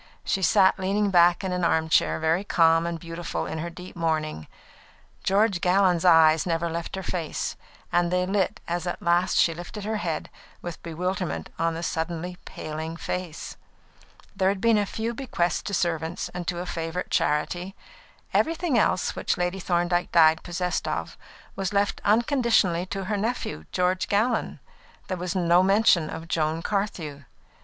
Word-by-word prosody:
She 195 - -1
sat 190 +2 +4
leaning 200 +2 +1
back 175 +1 +5
in 190 - -2
an 180 -1 -1
armchair, 160 -1 +2
very 160 +4 +1
calm 165 -3 +3
and 170 -1 -3
beautiful 165 0 -4
in 160 - -4
her 170 +2 -3
deep 180 +2 -11
mourning. 155 - -2 0.8
George 195 -2 +2
Gallon's 180 -2 +3
eyes 160 -3 +6
never 165 0 0
left 170 +2 -4
her 190 - -5
face, 170 -3 -3 0.4
and 175 0 +2
they 180 +1 +1
lit 195 0 0
as 175 0 -2
at 175 - -3
last 175 +1 +2
she 165 - +4
lifted 175 +5 -8
her 215 +1 -2
head, 165 -6 -3 0.3
with 175 -2 -7
bewilderment 180 +2 -3
on 165 0 +1
the 165 - -5
suddenly 170 +2 -3
paling 160 +2 -6
face. 175 -2 -5 0.8
There 190 0 +2
had 195 0 -1
been 230 0 +4
a 205 - 0
few 225 +4 -3
bequests 215 -9 -1
to 200 - -6
servants 165 -1 -1
and 180 -1 -6
to 175 - -1
a 175 - -4
favourite 165 +1 -4
charity. 175 +6 0 0.6
Everything 330 -5 +2
else 185 - +1
which - - -1
Lady 180 +2 -1
Thorndyke 175 0 0
died 160 -1 +5
possessed 180 0 -2
of - - -3 0.4
was 195 0 -3
left 200 0 +1
unconditionally 220 - +2
to 195 +1 -4
her 210 +2 -2
nephew, 205 - -3
George 180 +1 +1
Gallon. 220 +4 0 0.5
There 185 - -2
was 180 +1 -3
no 175 -1 +4
mention 190 -4 +4
of 165 +1 -7
Joan 160 0 -1
Carthew. 165 - -3
175 Hz, 165 wpm, -25 LUFS, 165-195 Hz, 0.8 s, eyes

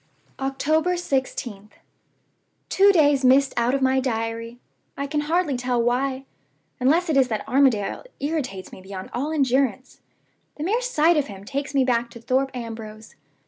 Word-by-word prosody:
"October 305 +6 +1
16th. 260 - -3 1.0
Two 400 +1 +5
days 290 -6 +3
missed 265 +2 +4
out 240 +2 +1
of 275 - -1
my 265 0 +3
Diary! 230 -1 -3 0.4
I 280 - -2
can 295 +1 -1
hardly 315 -1 0
tell 250 0 -1
why, 260 +3 0 0.5
unless 310 +8 +3
it 315 - 0
is 265 -2 +4
that 220 -3 -4
Armadale 255 - +2
irritates 275 - -3
me - - -11
beyond 190 0 -8
all 285 +5 -2
endurance. 265 -3 0 0.5
The 300 - -5
mere 435 +8 +1
sight 340 -9 +3
of 290 - +1
him 195 -1 -10
takes 280 +4 -4
me 270 - +4
back 240 -1 +1
to 235 0 -12
Thorpe 260 +3 0
Ambrose. 220 -2 -8
265 Hz, 155 wpm, -23 LUFS, 235-290 Hz, 1.0 s, Two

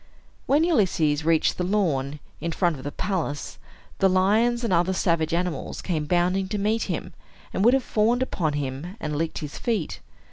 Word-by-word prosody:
When 290 +3 +4
Ulysses 175 - +2
reached 165 +2 +2
the - - +1
lawn, 150 -8 0 0.2
in 170 +2 -2
front 170 -1 +1
of 130 - -10
the 145 - -4
palace, 165 -7 -3 0.4
the 195 - +5
lions 220 +6 +3
and 230 - +1
other 175 +2 +2
savage 165 -4 +1
animals 170 -4 -2
came 160 -5 -2
bounding 180 +3 +1
to 210 - -2
meet 215 +3 0
him, - - -3 0.4
and 190 - 0
would 240 +4 +6
have 270 - +1
fawned 230 +4 +2
upon 160 - -1
him 145 +7 -4
and 150 -6 -3
licked 160 +2 -2
his 145 - -8
feet. 220 -9 -2
180 Hz, 180 wpm, -25 LUFS, 155-210 Hz, 0.4 s, would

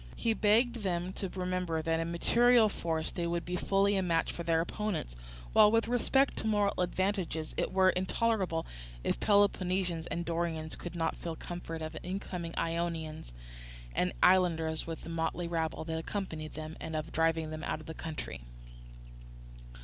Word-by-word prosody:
He 230 - +1
begged 225 +4 +3
them 185 -3 -2
to 195 - -3
remember 180 -3 -1
that 165 0 +1
in 165 +1 -2
material 235 +6 +5
force 160 -4 -2
they 170 -2 -2
would 170 0 -1
be 180 - -2
fully 200 +2 +2
a 190 - +2
match 170 -3 +1
for - - -6
their 165 -1 +2
opponents, 170 - -2 0.4
while, 210 - +7
with 225 0 +3
respect 265 +3 +2
to 220 - 0
moral 205 -2 +2
advantages, 180 -3 -1
it - - -1
were 185 0 +5
intolerable 185 -2 0 0.4
if - - 0
Peloponnesians 185 -4 +2
and 170 0 -3
Dorians 165 -1 -2
should 175 0 -6
not 165 -1 0
feel 165 -1 -5
confident 165 -1 -6
of 155 - -6
overcoming 180 -2 -4
Ionians 165 - -2 0.6
and 180 - +1
islanders 165 -4 +3
with 165 -1 -5
the - - -8
motley 165 +1 -1
rabble 165 -2 -1
that 160 0 -3
accompanied 160 -4 -5
them, 155 +1 -6
and 160 0 -5
of 155 0 -3
driving 160 -1 +1
them 155 0 -5
out - - -2
of 155 - -12
the 160 - -6
country. 155 - -6
170 Hz, 165 wpm, -32 LUFS, 160-195 Hz, 0.6 s, while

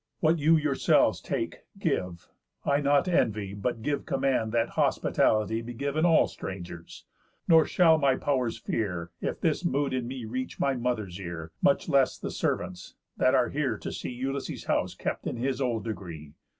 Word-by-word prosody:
What 165 +1 +3
you 160 +3 +5
yourselves 150 -3 +2
take, - - -3 0.2
give; 85 -2 -2 0.4
I 140 +1 +2
not 145 +4 +3
envy, 110 - +1
But 110 +3 -3
give 145 +2 -2
command 125 -5 +1
that 115 0 +1
hospitality 110 +1 +1
Be 120 +1 -7
giv'n 140 +5 0
all 165 -2 +5
strangers. 85 -3 -8 0.4
Nor 160 -2 +6
shall 165 -3 +5
my 135 -3 +3
pow'rs 130 -5 0
fear, 90 -6 -3
If - - -3
this 160 +1 +1
mood 140 -5 0
in 125 -2 -1
me 125 -2 -5
reach 130 +4 -4
my 140 - +2
mother's 120 -7 -2
ear; 85 -3 -6
Much 185 0 +3
less 140 -5 +3
the - - -5
servants', 90 0 -3 0.2
that - - +4
are - - +3
here - - -1
to - - -6
see - - -5
Ulysses' 135 +2 -4
house - - 0
kept - - -3
in - - -3
his 130 +2 -1
old 120 -4 0
degree. 85 -9 -7
125 Hz, 170 wpm, -28 LUFS, 105-140 Hz, 0.4 s, Nor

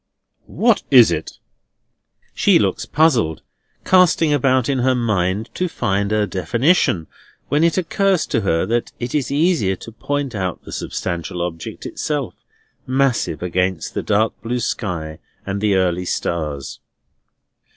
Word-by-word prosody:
"What 230 -1 +2
is 125 -5 +7
it?" - - -4 1.0
She - - +4
looks - - -1
puzzled, 125 - +2 0.4
casting 175 -4 +4
about 130 -3 +2
in 135 -2 0
her 130 +1 +2
mind 105 -2 -1
to 180 -1 -2
find 100 -6 -1
a 105 -1 +2
definition, 115 - +1 0.4
when 150 +2 +2
it 170 +1 +2
occurs 190 +1 +1
to 115 - -1
her 80 -5 +1
that 120 +1 -1
it 120 0 -4
is 145 -4 0
easier 145 - +2
to 115 - -11
point 140 +3 -3
out 95 -4 -3
the - - -11
substantial 85 0 -4
object 80 -2 -6
itself, 140 - -3 0.5
massive 130 - 0
against 90 0 -1
the - - -2
dark 110 +1 +1
blue 120 +2 -2
sky 85 -10 -3 0.3
and 100 0 -3
the 105 -2 +2
early 90 -1 +1
stars. 75 -6 -3
115 Hz, 140 wpm, -20 LUFS, 90-140 Hz, 1.0 s, is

